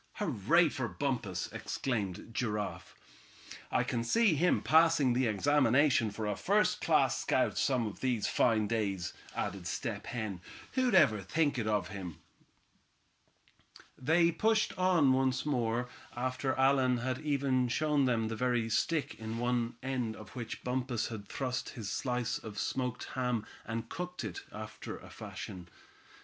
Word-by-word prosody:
"Hurray 165 - +3
for 130 -3 -3
Bumpus!" 115 -10 -2
exclaimed 110 -5 -3
Giraffe. 105 -4 -3 0.8
"I - - +2
can 115 -1 -1
see 215 - +3
him 175 +4 +2
passing 160 -5 +5
the 125 0 +2
examination 130 +2 +3
for 105 +1 -5
a 105 -1 -1
first - - +2
class - - +3
scout - - +1
some 125 -4 +1
of 105 - -6
these 125 -5 0
fine 110 -3 +3
days," 100 -5 -1 0.2
added 95 -3 -3
Step - - -4
Hen. 110 -7 -4 0.3
"Who'd 255 -5 +2
ever 110 - +5
think 145 - +1
it 110 - -2
of 105 -4 0
him?" 90 -6 -6 1.8
They 170 +5 +3
pushed 220 +5 +1
on 175 -7 +4
once 130 0 +1
more, 120 -4 0 0.3
after 130 +2 -1
Allan 130 -1 +3
had 130 +1 -2
even 135 -4 +1
shown 150 +2 +2
them 115 -3 +1
the 110 - -3
very 120 -2 0
stick 150 +7 0
on 110 +1 -4
one 120 -1 0
end 125 -4 -2
of 105 - -12
which 115 -3 -6
Bumpus 125 -2 -1
had 105 -3 -7
thrust 130 0 -3
his 105 -3 -4
slice 125 -2 -1
of 105 -2 -9
smoked 125 +2 -2
ham, 125 -4 -1 0.2
and 115 0 -3
cooked 180 +2 -5
it, 100 -6 -5
after 110 0 -7
a - - -13
fashion. 90 -2 -8
125 Hz, 145 wpm, -32 LUFS, 110-140 Hz, 1.8 s, passing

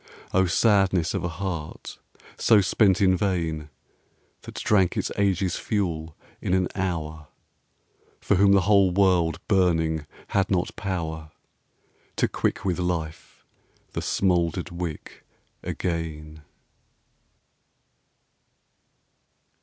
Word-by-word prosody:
O 95 0 +3
sadness 95 -3 +2
of - - -2
a - - 0
heart 85 -2 -6 0.4
so 110 - +5
spent 95 0 +3
in 95 -1 +4
vain, 85 -6 -1 0.7
That - - -11
drank 95 -4 +2
its - - -1
age's 95 -2 +1
fuel 85 -7 -2 0.2
in 90 - 0
an 90 -1 +1
hour: 80 -5 -3 0.9
For - - 0
whom 100 +1 +5
the 100 - +5
whole 100 0 +4
world 90 -3 +2
burning 80 -5 +1 0.2
had 100 -1 +1
not 90 -3 0
power 80 -5 -4 0.9
To - - +2
quick - - -2
with 90 -2 0
life 85 -2 -4 0.5
the - - -3
smouldered 90 -1 0
wick 85 -3 -6 0.4
again! 80 -3 -4
90 Hz, 105 wpm, -25 LUFS, 80-95 Hz, 0.9 s, so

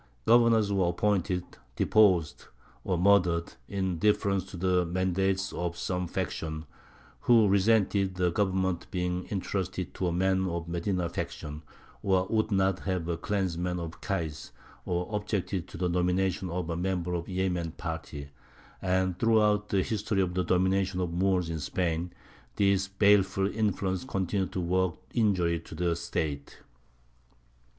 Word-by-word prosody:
Governors 115 -3 +5
were 95 -3 +2
appointed, 90 -1 0 0.3
deposed, 95 -8 +3 0.4
or 90 - 0
murdered, 90 -3 +3
in 95 -4 -2
deference 100 -1 +2
to 95 -1 -9
the 90 0 +2
mandates 95 +2 0
of 85 0 -3
some 90 -1 -2
faction, 80 -1 -4 0.5
who 115 - +5
resented 100 -1 +2
the 90 -1 +1
government 95 -2 0
being 90 0 -2
entrusted 95 -2 -3
to 95 - -2
a - - 0
man 95 +2 +1
of 85 -2 -3
the 85 0 -3
Medīna 90 -2 -1
faction, 75 -2 -5 0.4
or 95 -1 +2
would 110 0 +1
not 95 -1 +2
have 90 -4 -2
a 85 - 0
clansman 90 -1 -2
of 85 -1 -7
Kays, 80 -6 -3 0.4
or 90 0 -1
objected 100 -3 -2
to - - -10
the 90 +1 0
nomination 90 +1 0
of 85 0 -3
a - - -2
member 90 0 -1
of 85 -1 -2
the 95 - -6
Yemen 90 -3 -1
party; 80 -4 -6 0.5
and, 95 -1 0
throughout 105 -2 +3
the 95 -2 +2
history 105 -1 -1
of 90 -1 -2
the 90 0 0
domination 95 +1 +1
of 90 -2 -1
the 85 - -4
Moors 95 -2 +2
in 80 -1 -3
Spain, 85 +2 -1 0.4
these 100 -1 +2
baleful 100 -1 +3
influences 100 0 -1
continued 95 0 -1
to 90 - -2
work 90 0 +1 0.2
injury 90 -7 +2
to 80 - -11
the 85 0 0
State. 70 -3 -3
95 Hz, 150 wpm, -29 LUFS, 85-95 Hz, 0.5 s, Governors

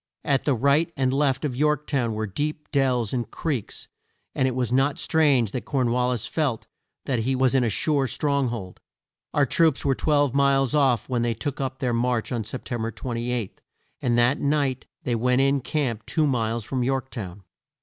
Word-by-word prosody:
At 140 -2 +1
the 145 - +2
right 140 +7 +2
and 130 -1 +1
left 140 0 +1
of 130 -4 -2
York 150 +1 +1
town 120 -6 -1
were 110 0 -2
deep 150 - -4
dells 130 -6 +1
and 120 -2 -2
creeks, 140 -10 -4 0.5
and 130 - +1
it 130 - -2
was 125 -2 -1
not 135 +2 +2
strange 140 - +2
that 125 - -4
Corn 130 -4 0
wal 125 +1 +1
lis 125 -4 -2
felt 140 -8 -1 0.4
that 125 -4 0
he 130 +4 0
was 130 0 +2
in 130 -2 +3
a 115 - +1
sure 140 +4 +1
strong 140 +2 0
hold. 110 -6 -6 0.5
Our 145 - +3
troops 160 +2 +2
were 135 - +3
twelve 145 -1 +1
miles 135 -2 +3
off 135 -7 +2
when 125 -2 -1
they 120 -1 0
took 145 0 -4
up 130 -1 -3
their 125 -2 -1
march 120 0 0
on 120 -3 -1
Sep 125 +4 -6
tem 120 -3 -3
ber 115 - -1
28, 120 -2 -4 0.4
and 120 -1 +1
that 120 +4 +3
night 140 -3 0 0.2
they 125 - -1
went 125 +3 +2
in 135 0 +2
camp 120 -7 -2
two 155 -2 +1
miles 115 -4 0
from 130 +1 -2
York 130 +1 -1
town. 100 -5 -7
130 Hz, 200 wpm, -24 LUFS, 120-140 Hz, 0.5 s, in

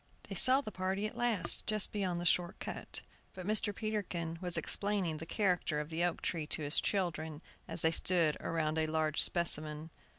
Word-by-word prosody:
They - - -6
saw 260 +1 +11
the 215 - -9
party 190 +2 -4
at 215 - -7
last, 220 -8 +2
just 215 -2 +1
beyond 185 -4 -3
the 175 - -6
short 175 +1 -1
cut; - - -8 0.3
but 185 -1 -9
Mr. 215 +1 0
Peterkin 190 -6 -5
was 180 -2 -2
explaining 200 -6 -1
the 165 +2 -10
character 180 -7 -2
of 150 +1 -7
the 165 +1 -3
oak 175 -1 -3
tree 160 -4 -4
to 155 - -3
his 145 +2 +1
children 160 -5 -4 0.2
as - - -2
they 160 - +2
stood 165 -2 0
around 160 -1 -3
a 155 - -1
large 155 -1 -1
specimen. 155 -2 -2
175 Hz, 190 wpm, -31 LUFS, 160-200 Hz, 0.3 s, saw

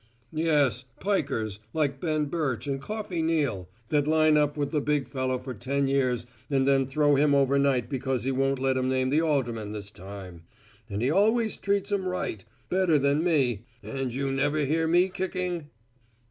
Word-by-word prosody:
"Yes, 145 -7 +2
'pikers' 130 - -1 0.2
like 140 -4 0
Ben 155 -3 0
Birch 145 -6 -2
and 135 -1 -2
Coffey 210 -1 -4
Neal, 145 - 0 0.2
that 145 -1 +2
line 155 0 +4
up 150 0 +2
with 145 -1 -1
the 150 -3 +1
big 145 -1 0
fellow 130 -2 -1
for 130 +1 -7
ten 135 +5 -1
years 130 -3 +1 0.2
and 135 -2 +2
then 135 -1 +3
throw 145 +2 +3
him 145 +1 +4
overnight 140 -2 +2
because 130 -3 -2
he 135 - 0
won't 135 +1 +1
let 130 0 +1
'em 130 0 0
name 130 0 +1
the 155 +3 +3
alderman 120 -9 -1
this 100 -1 -5
time. 95 -3 -10 0.5
And 100 +2 -2
he 130 - +2
always 220 +4 +3
treated 200 0 -1
'em 190 -2 0
right. 180 - -3 0.2
Better 180 -4 +3
than 140 +2 +2
me. 130 - +1 0.2
An' 135 -1 -3
jou 135 +2 -2
ever 145 +1 +1
hear 160 +3 +1
me 175 +3 +4
kicking?" 180 -4 -3
140 Hz, 175 wpm, -27 LUFS, 130-160 Hz, 0.5 s, line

